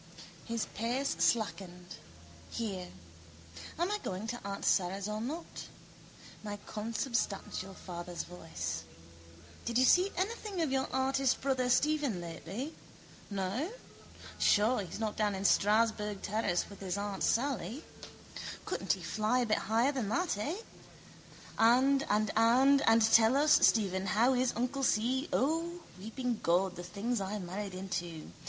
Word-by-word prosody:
His 230 Hz, -1 st, -2 dB
pace 250 Hz, +5 st, -1 dB
slackened. 180 Hz, -5 st, -1 dB, 0.5 s
Here. 195 Hz, -6 st, -4 dB, 0.9 s
Am 345 Hz, +4 st, 0 dB
I 420 Hz, -, 0 dB
going 190 Hz, -, -4 dB
to 240 Hz, -, -3 dB
aunt 200 Hz, 0 st, -4 dB
Sara's 195 Hz, +2 st, +1 dB
or 215 Hz, 0 st, -3 dB
not? 310 Hz, +8 st, -6 dB, 0.8 s
My 205 Hz, -1 st, -5 dB
consubstantial 215 Hz, -3 st, -3 dB
father's 175 Hz, -1 st, -6 dB
voice. 85 Hz, -, -5 dB, 0.8 s
Did 235 Hz, 0 st, -1 dB
you 255 Hz, -, +5 dB
see 365 Hz, +8 st, +5 dB
anything 405 Hz, 0 st, -2 dB
of 300 Hz, -, -1 dB
your 265 Hz, 0 st, +1 dB
artist 265 Hz, 0 st, +1 dB
brother 260 Hz, -2 st, +1 dB
Stephen 290 Hz, -6 st, +2 dB
lately? 180 Hz, -, -6 dB, 0.6 s
No? 200 Hz, -, -2 dB, 0.7 s
Sure 215 Hz, +3 st, +4 dB
he's 190 Hz, +2 st, -7 dB
not 220 Hz, -2 st, -2 dB
down 210 Hz, -2 st, +1 dB
in 190 Hz, +1 st, -4 dB
Strasburg 210 Hz, 0 st, +2 dB
terrace 200 Hz, -4 st, 0 dB
with 200 Hz, -, -12 dB
his 190 Hz, 0 st, -3 dB
aunt 200 Hz, -1 st, -4 dB
Sally? 245 Hz, -, 0 dB, 0.8 s
Couldn't -, -, 0 dB
he -, -, -6 dB
fly 220 Hz, +4 st, +1 dB
a -, -, +1 dB
bit 215 Hz, -1 st, +1 dB
higher 230 Hz, +5 st, +3 dB
than 255 Hz, -8 st, -2 dB
that, 350 Hz, -, 0 dB
eh? 285 Hz, -, -2 dB, 1.0 s
And 260 Hz, +4 st, +5 dB
and 210 Hz, 0 st, +2 dB
and 255 Hz, +5 st, +5 dB
and 225 Hz, 0 st, +6 dB
tell 225 Hz, +3 st, +5 dB
us, 300 Hz, +1 st, +3 dB, 0.2 s
Stephen, 195 Hz, -3 st, +1 dB
how 235 Hz, +7 st, +3 dB
is 255 Hz, 0 st, +2 dB
uncle 250 Hz, +4 st, -1 dB
Si? 260 Hz, +4 st, +1 dB
O, 330 Hz, +5 st, 0 dB, 0.2 s
weeping 235 Hz, +3 st, -3 dB
God, 180 Hz, +2 st, +2 dB
the 175 Hz, -, -6 dB
things 205 Hz, +6 st, -2 dB
I 195 Hz, +2 st, -3 dB
married 190 Hz, +1 st, -5 dB
into! 175 Hz, -4 st, -5 dB
220 Hz, 140 wpm, -32 LUFS, 195-260 Hz, 1.0 s, and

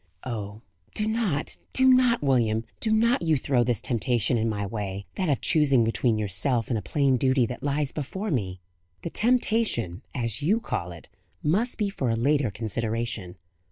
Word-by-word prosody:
"Oh, 105 Hz, -3 st, -5 dB, 0.3 s
do 210 Hz, -, 0 dB
not, 220 Hz, -10 st, -1 dB, 0.2 s
do 260 Hz, 0 st, +4 dB
not! 255 Hz, -, +4 dB
William, 115 Hz, -5 st, +2 dB, 0.2 s
do 220 Hz, -, 0 dB
not 230 Hz, +1 st, +3 dB
you 160 Hz, -3 st, +2 dB
throw 125 Hz, -1 st, +1 dB
this 120 Hz, -1 st, -1 dB
temptation 120 Hz, 0 st, +1 dB
in 115 Hz, 0 st, +1 dB
my 100 Hz, -2 st, -2 dB
way 100 Hz, -1 st, -5 dB
that 185 Hz, -4 st, -1 dB
of 140 Hz, -, +1 dB
choosing 140 Hz, -6 st, +4 dB
between 115 Hz, 0 st, +1 dB
yourself 110 Hz, +4 st, -1 dB
and 120 Hz, -, 0 dB
a -, -, -6 dB
plain 135 Hz, +6 st, +1 dB
duty 130 Hz, 0 st, +2 dB
that 125 Hz, +3 st, -6 dB
lies 145 Hz, 0 st, 0 dB
before 190 Hz, +8 st, -4 dB
me." 95 Hz, -9 st, -2 dB, 0.4 s
"The 170 Hz, -, -4 dB
temptation, 220 Hz, -, +1 dB
as 115 Hz, 0 st, -2 dB
you 195 Hz, +10 st, +2 dB
call 90 Hz, -, -4 dB
it, 85 Hz, -2 st, -11 dB, 0.4 s
must 205 Hz, +11 st, +1 dB
be 205 Hz, -3 st, -1 dB
for 135 Hz, -10 st, -2 dB
a 115 Hz, -, +1 dB
later 140 Hz, +2 st, +2 dB
consideration. 110 Hz, -2 st, -3 dB
125 Hz, 175 wpm, -26 LUFS, 110-165 Hz, 0.4 s, do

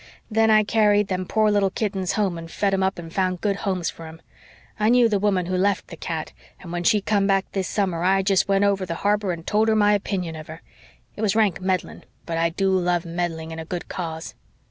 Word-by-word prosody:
Then 225 Hz, +1 st, +3 dB
I 215 Hz, -1 st, +5 dB
carried 210 Hz, -1 st, +2 dB
them 185 Hz, -1 st, -2 dB
poor 215 Hz, -1 st, +2 dB
little 200 Hz, -1 st, +2 dB
kittens 190 Hz, -3 st, -2 dB
home 200 Hz, -5 st, 0 dB
and 165 Hz, 0 st, -8 dB
fed 200 Hz, +3 st, 0 dB
'em 195 Hz, -, +1 dB
up 190 Hz, +1 st, 0 dB
and 165 Hz, -1 st, -9 dB
found 185 Hz, -2 st, 0 dB
good 200 Hz, 0 st, 0 dB
homes 185 Hz, -4 st, -2 dB
for 165 Hz, -, -11 dB
'em. 160 Hz, +1 st, -11 dB, 0.6 s
I 215 Hz, +1 st, +3 dB
knew 245 Hz, 0 st, +5 dB
the 210 Hz, -3 st, 0 dB
woman 190 Hz, -3 st, +1 dB
who 185 Hz, +1 st, -2 dB
left 195 Hz, +2 st, 0 dB
the 165 Hz, -, -8 dB
cat 160 Hz, 0 st, -5 dB, 0.3 s
and 170 Hz, -, -10 dB
when 175 Hz, 0 st, -3 dB
she 210 Hz, +2 st, +3 dB
come 200 Hz, -1 st, +1 dB
back 195 Hz, -1 st, +2 dB
this 190 Hz, -2 st, -2 dB
summer 185 Hz, -5 st, -1 dB
I 195 Hz, +1 st, +3 dB
jest 195 Hz, -1 st, +2 dB
went 195 Hz, 0 st, +2 dB
over 200 Hz, -1 st, +2 dB
the 170 Hz, -2 st, -4 dB
harbor 205 Hz, -2 st, +2 dB
and 165 Hz, -1 st, -6 dB
told 215 Hz, +1 st, +2 dB
her 220 Hz, -, +3 dB
my 210 Hz, -1 st, +4 dB
opinion 185 Hz, -5 st, -2 dB
of 155 Hz, -1 st, -9 dB
her. 160 Hz, +1 st, -10 dB, 0.5 s
It -, -, -7 dB
was 215 Hz, -2 st, +1 dB
rank 210 Hz, -7 st, +2 dB
meddling, 185 Hz, -1 st, -2 dB, 0.2 s
but 165 Hz, -1 st, -2 dB
I 165 Hz, 0 st, +2 dB
do 190 Hz, +3 st, 0 dB
love 175 Hz, -2 st, +1 dB
meddling 165 Hz, -1 st, -3 dB
in 160 Hz, -, -6 dB
a -, -, -4 dB
good 175 Hz, +2 st, -6 dB
cause." 160 Hz, -3 st, -5 dB
190 Hz, 240 wpm, -23 LUFS, 175-205 Hz, 0.6 s, I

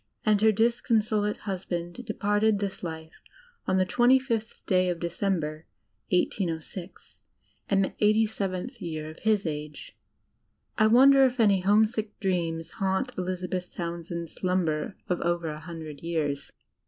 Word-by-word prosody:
And 210 Hz, -2 st, +3 dB
her 220 Hz, 0 st, +6 dB
disconso 225 Hz, -1 st, +2 dB
late 210 Hz, 0 st, -1 dB
husband 175 Hz, -3 st, -3 dB
departed 210 Hz, 0 st, +2 dB
this 200 Hz, -1 st, -4 dB
life 160 Hz, -2 st, -7 dB, 0.5 s
on 185 Hz, -, +2 dB
the 185 Hz, -, +3 dB
25 255 Hz, +6 st, +4 dB
th 220 Hz, +2 st, -18 dB
day 185 Hz, -2 st, +2 dB
of 175 Hz, -1 st, -2 dB
Decem 175 Hz, +2 st, 0 dB
ber, 155 Hz, +1 st, -6 dB, 0.4 s
1806, 180 Hz, 0 st, -3 dB, 0.5 s
in 195 Hz, -1 st, +3 dB
the -, -, 0 dB
87th 210 Hz, -3 st, +1 dB
year 155 Hz, -2 st, -4 dB
of 155 Hz, -, -14 dB
his 215 Hz, -3 st, +1 dB
age." 150 Hz, -1 st, -6 dB, 0.8 s
I 215 Hz, -, +4 dB
wonder 270 Hz, +4 st, +7 dB
if 255 Hz, -1 st, +2 dB
any 205 Hz, -4 st, +5 dB
homesick 215 Hz, +3 st, +2 dB
dreams 170 Hz, -4 st, -1 dB
haunt 190 Hz, -1 st, -1 dB
Elizabeth 180 Hz, 0 st, -3 dB
Townsend's 170 Hz, -1 st, -5 dB
slumber 180 Hz, -2 st, -1 dB
of 180 Hz, -, -1 dB
over 170 Hz, -1 st, 0 dB
a 150 Hz, 0 st, -5 dB
hundred 160 Hz, -3 st, -8 dB
years! 150 Hz, -4 st, -2 dB
185 Hz, 140 wpm, -27 LUFS, 170-210 Hz, 0.8 s, wonder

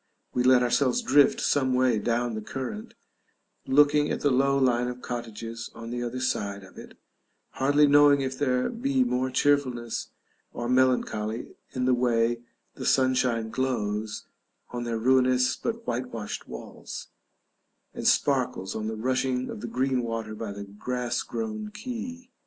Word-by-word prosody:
We 125 Hz, -, +1 dB
let 125 Hz, 0 st, +5 dB
ourselves 125 Hz, +1 st, +2 dB
drift 140 Hz, +1 st, +5 dB
some 130 Hz, -2 st, +2 dB
way 125 Hz, -3 st, +3 dB
down 120 Hz, +1 st, 0 dB
the 110 Hz, -, -4 dB
current, 135 Hz, -, -6 dB, 0.7 s
looking 145 Hz, +2 st, +4 dB
at -, -, -2 dB
the 145 Hz, -, +3 dB
low 135 Hz, +2 st, +3 dB
line 125 Hz, -2 st, +2 dB
of 125 Hz, 0 st, -6 dB
cottages 115 Hz, -1 st, -6 dB
on 115 Hz, 0 st, -7 dB
the 120 Hz, 0 st, -3 dB
other 120 Hz, +1 st, -3 dB
side 100 Hz, -6 st, -2 dB
of 95 Hz, -, -15 dB
it, -, -, -12 dB, 0.5 s
hardly 145 Hz, +2 st, +3 dB
knowing 145 Hz, -1 st, +6 dB
if 130 Hz, -1 st, -2 dB
there 130 Hz, -2 st, +1 dB
be 260 Hz, +2 st, +1 dB
more 130 Hz, -, 0 dB
cheerfulness 130 Hz, -4 st, 0 dB, 0.5 s
or 120 Hz, -, -4 dB
melancholy 120 Hz, -3 st, +1 dB, 0.2 s
in 125 Hz, -1 st, -1 dB
the 130 Hz, -, +4 dB
way 120 Hz, -1 st, +1 dB, 0.3 s
the -, -, -8 dB
sunshine 125 Hz, -4 st, +2 dB
glows 110 Hz, -4 st, -2 dB, 0.5 s
on 120 Hz, -1 st, -4 dB
their 115 Hz, -1 st, -1 dB
ruinous 130 Hz, +1 st, +3 dB
but 230 Hz, 0 st, -4 dB
whitewashed 115 Hz, -3 st, -4 dB
walls, -, -, -8 dB, 0.8 s
and -, -, -2 dB
sparkles 95 Hz, +1 st, +1 dB
on 110 Hz, 0 st, -3 dB
the 110 Hz, -, -3 dB
rushing 130 Hz, +2 st, -1 dB
of -, -, -7 dB
the 120 Hz, -, -4 dB
green 130 Hz, 0 st, 0 dB
water 115 Hz, -2 st, -4 dB
by 110 Hz, -1 st, -5 dB
the 100 Hz, 0 st, -6 dB
grass 120 Hz, +5 st, -3 dB
grown 215 Hz, -1 st, -4 dB
quay. 250 Hz, +4 st, -7 dB
125 Hz, 150 wpm, -27 LUFS, 115-135 Hz, 0.8 s, knowing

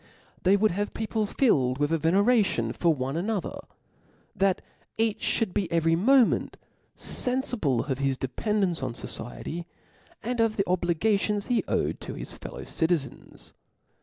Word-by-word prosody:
They 190 Hz, +2 st, +4 dB
would 215 Hz, +1 st, +3 dB
have 205 Hz, +4 st, -3 dB
people 220 Hz, -1 st, -1 dB
filled 130 Hz, -, +2 dB
with 145 Hz, +2 st, 0 dB
a 165 Hz, -, +3 dB
veneration 185 Hz, -, +2 dB
for 170 Hz, -, +2 dB
one 135 Hz, -1 st, -2 dB
another, 200 Hz, +3 st, -2 dB, 0.8 s
that 195 Hz, -1 st, +1 dB, 0.3 s
each' 225 Hz, -1 st, +1 dB
Ihould 215 Hz, -6 st, -1 dB
be 185 Hz, -5 st, -1 dB
every 165 Hz, -1 st, +3 dB
moment 245 Hz, +6 st, +3 dB, 0.4 s
fenfible 245 Hz, -, 0 dB
of 135 Hz, -2 st, -2 dB
his 135 Hz, -1 st, 0 dB
dependence 180 Hz, -, -1 dB
on 130 Hz, -3 st, -3 dB
fociety, 155 Hz, +9 st, -5 dB, 0.6 s
and 245 Hz, +1 st, -2 dB
of 225 Hz, -1 st, +2 dB
the 195 Hz, -, +1 dB
obligations 195 Hz, +4 st, +1 dB
he 245 Hz, -3 st, +1 dB
owed -, -, -1 dB
to -, -, -6 dB
hii -, -, -6 dB
fellow -, -, -7 dB
citizens. 160 Hz, -6 st, -3 dB
185 Hz, 140 wpm, -27 LUFS, 155-215 Hz, 0.8 s, They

